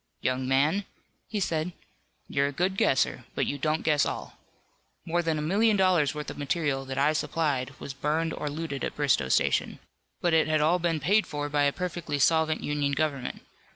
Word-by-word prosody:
"Young 130 0 -1
man," 150 +9 +2 0.4
he 215 - -3
said, 170 -2 -1 0.5
"you're 140 0 +1
a - - -3
good 180 +6 0
guesser, 130 -7 +1
but - - +1
you 145 - -3
don't 155 +3 0
guess 150 -3 +3
all. - - -5 0.7
More 175 +1 +1
than 165 -2 0
a 150 - -2
million 210 +6 +3
dollars 175 -7 +3
worth 150 0 -5
of - - -10
material 145 -2 -1
that 130 0 -5
I 145 +3 +3
supplied 140 -5 -1
was 140 - -6
burned 155 +4 -1
or 150 - -3
looted 145 -3 -4
at - - -3
Bristoe 140 - +1
Station. - - +1 0.4
But 175 -2 +1
it 160 -1 +4
had 155 0 +2
all 160 +4 +3
been 165 -2 0
paid 205 +9 +2
for 145 -1 -3
by 145 -1 +2
a 140 - +3
perfectly 175 -3 -3
solvent 160 +2 +2
Union 145 -1 0
government. 140 -3 -2
150 Hz, 190 wpm, -27 LUFS, 140-165 Hz, 0.7 s, it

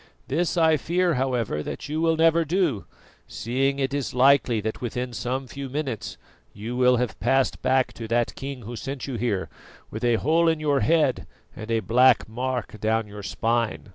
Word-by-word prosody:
This 175 +1 0
I 160 -2 +4
fear, 175 +2 +1
however, 125 - -1
that - - -6
you 155 +2 -2
will 165 -1 +2
never 165 +1 +4
do, 165 - 0 0.4
seeing 135 +4 -1
it 135 0 -1
is 140 -3 -3
likely 130 -3 +4
that 110 +1 -4
within 125 +1 -4
some 130 +3 -3
few 135 +1 -7
minutes 135 -5 -4 0.4
you 110 +4 -6
will 125 0 +4
have 125 -1 -2
passed 135 -1 +1
back 130 0 +2
to 115 - -7
that 120 +1 0
King 135 -2 -7
who 120 +3 -7
sent 135 +3 -5
you 135 - -5
here, 105 -5 -1 0.4
with 110 - -6
a 120 -1 +3
hole 160 +8 +2
in 160 -1 +2
your 145 -2 +1
head 155 -5 +2 0.3
and 110 - -8
a 115 -1 +1
black 125 +5 +4
mark 125 -1 -4
down 110 +1 +1
your 105 0 -9
spine." 115 +2 -1
130 Hz, 185 wpm, -25 LUFS, 115-145 Hz, 0.4 s, I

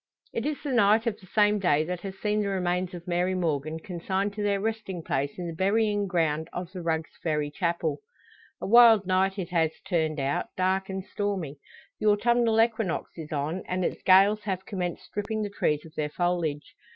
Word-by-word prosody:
It - - -2
is 300 -1 -1
the 290 - -2
night 220 -1 +4
of 230 -3 -1
the 185 - -17
same 210 +1 +3
day 155 -5 +3
that 180 +2 -4
has 195 -1 -7
seen 210 0 0
the 205 - -1
remains 180 -1 -1
of 175 0 -10
Mary 180 +1 +1
Morgan 160 -3 -1
consigned 190 +4 -2
to 210 - -5
their 200 -1 +1
resting 215 -5 -3
place 140 -1 -2
in 180 - -4
the 170 - -4
burying 205 +3 +1
ground 160 -3 0
of 180 0 -5
the 185 -2 -6
Rugg's 160 -1 -1
Ferry 150 -3 -1
chapel. 170 +1 -1 0.6
A - - -5
wild 225 -2 +7
night 190 +1 +1
it 185 -3 -4
has 165 -3 0
turned 160 -4 0
out, 140 +1 -1
dark 190 +1 +1
and 190 0 -4
stormy. 190 -10 -3 0.4
The 215 - 0
autumnal 230 +2 +3
equinox 225 -5 +1
is 160 -2 -8
on, 155 +5 -2
and 180 0 -1
its - - -3
gales 195 +3 +5
have 190 -2 -3
commenced 180 -5 -4
stripping 215 +1 -3
the 205 - -4
trees 150 -6 0
of 160 - -13
their 150 -1 -2
foliage. 170 -3 -1
185 Hz, 200 wpm, -27 LUFS, 165-205 Hz, 0.6 s, wild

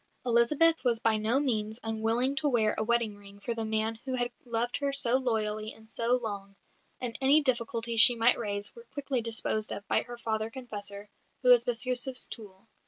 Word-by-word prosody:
Elizabeth 275 +8 +4
was 240 -3 +1
by 225 -1 +1
no 220 +5 0
means 220 -5 -2
unwilling 225 +4 0
to 300 0 0
wear 220 -4 +1
a - - -2
wedding 230 -2 0
ring 200 0 -15
for 235 +3 -4
the 225 -1 -4
man 220 0 -1
who 260 -1 -3
had 245 -1 -2
loved 235 0 -1
her 280 -1 -2
so 260 -3 +4
loyally 215 -4 -2
and 220 0 -18
so 230 +2 0
long; 200 -5 -6 0.4
and 245 -2 -3
any 275 +3 +5
difficulties 235 -3 +1
she 245 - +9
might 235 +2 +3
raise 205 -2 -3
were 470 0 -14
quickly 275 -3 -2
disposed 220 -1 0
of 200 - -7
by - - +2
her 240 0 -9
father 220 -1 -3
confessor, 205 -5 -7 0.4
who 250 - +3
was 245 -1 +7
Bestyouzhev's 250 +2 -1
tool. 205 -2 -11
230 Hz, 190 wpm, -29 LUFS, 220-250 Hz, 0.4 s, she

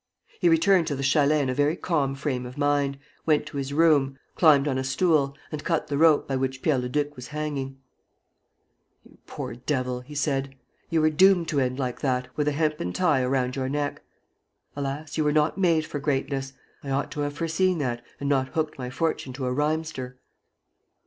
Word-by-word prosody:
He 175 - +4
returned 170 +1 +4
to 145 - -1
the 135 - -4
chalet 145 +2 +3
in 135 - -1
a - - -1
very 145 +4 +2
calm 145 -7 0
frame 130 -3 -3
of 125 - -11
mind, 145 -1 +1 0.3
went 155 -2 +3
to - - -7
his 135 0 -3
room, 145 -3 +3 0.2
climbed 150 -4 +5
on 130 -2 0
a - - -1
stool, 140 0 +1
and 150 -1 -5
cut 165 -3 -1
the 140 - -1
rope 160 -2 +5
by 135 - -1
which 130 0 -3
Pierre 150 -5 +2
Leduc 145 +4 -2
was 125 0 -9
hanging: 145 -2 -4 1.3
"You - - -20
poor - - -6
devil!" 125 0 -2
he 145 +4 -12
said. 135 -2 -1 0.3
"You 165 -1 +2
were 155 0 +3
doomed 180 +1 +4
to 145 - +1
end 130 -1 0
like 125 -3 -3
that, 125 -2 -1
with 150 -1 0
a - - +3
hempen 150 - -1
tie 160 -8 +2
around 125 0 0
your 130 -1 -2
neck. 145 +1 -2 0.7
Alas, 145 +2 -4
you - - +3
were 150 - +2
not 155 +5 +1
made 165 -4 +3
for 145 - -5
greatness: 135 -1 -2 0.3
I 140 - -6
ought 135 +1 -1
to 150 - -6
have 145 0 -2
foreseen 170 +3 +1
that 120 -5 -2 0.2
and 140 - -3
not 135 -2 +2
hooked 155 -3 -2
my 125 -1 -4
fortune 135 -1 -2
to 130 0 -4
a 125 - 0
rhymester!" 150 -3 -2
145 Hz, 200 wpm, -26 LUFS, 135-155 Hz, 1.3 s, climbed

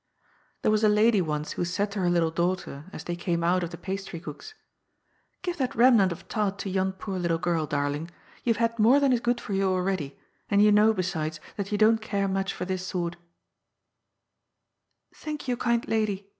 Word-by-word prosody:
There - - +3
was 215 0 +2
a 215 - +6
lady 210 0 +4
once 150 -2 -2
who - - -2
said 200 +4 -1
to 200 - -4
her 180 -2 +2
little 170 -2 +2
daughter, 170 -4 -2
as - - -8
they 175 - -3
came 170 -1 -1
out 180 +2 +2
of 170 - -3
the - - -8
pastrycook's: 190 - -7 0.4
" - - -44
Give 355 -1 -2
that 260 -3 -1
remnant 230 -6 +5
of 170 - -8
tart 205 -3 -1
to 195 - -4
yon 190 0 0
poor 190 0 -5
little 170 -2 +1
girl, 165 -1 0
dar 145 -1 0
ling! 145 +4 -4 0.3
you 235 - +3
have 230 +1 +1
had 230 - -19
more 240 +6 +6
than 275 -2 +3
is 245 - +2
good 240 +1 0
for 205 - -6
you 195 0 +2
already, 185 -6 -1 0.3
and 200 - +3
you 210 0 +6
know, 210 +1 +6
besides, 160 -6 -2 0.2
that 200 0 -4
you 210 - +1
don't 220 +1 +4
care 200 -2 -1
much 195 0 -1
for - - -5
this 185 0 -3
sort" 175 -2 -3 2.0
"Thank 300 -2 -6
you, 250 - +1
kind 235 -1 0
lady!" 205 -3 -1
195 Hz, 210 wpm, -27 LUFS, 175-215 Hz, 2.0 s, a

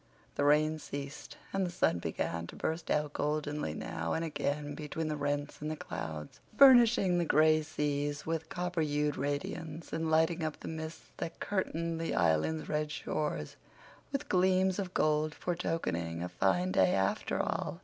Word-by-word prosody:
The - - 0
rain 155 +2 +4
ceased 140 -1 -7 0.2
and 195 0 +1
the 180 - -1
sun 85 - +1
began 85 0 -3
to - - -10
burst 160 +1 -3
out 150 -1 +1
goldenly 150 - -1
now 80 +1 -3
and 165 - -1
again 145 -1 -2
between 155 +2 -4
the 155 - -1
rents 145 0 -2
in 150 - -3
the 155 - -2
clouds, 75 - -6 0.2
burnishing 235 -9 +7
the - - +2
gray 155 0 +4
seas 145 -2 -2
with 160 0 -2
copper 180 -1 -2
hued 150 -1 +1
radiance, 150 +3 -4
and 160 0 -1
lighting 160 +1 +3
up 155 -1 -3
the - - -7
mists 160 0 -6
that 165 - -5
curtained 170 -4 -2
the 165 - -1
Island's 85 - +2
red 150 0 -1
shores 150 - -3 0.5
with 275 +1 -2
gleams 185 0 +3
of 185 -2 -4
gold 155 0 +2
foretokening 85 - -2
a 90 - -3
fine 90 0 +1
day 95 -1 +4
after 95 0 0
all. - - -2
155 Hz, 165 wpm, -32 LUFS, 145-165 Hz, 0.5 s, burnishing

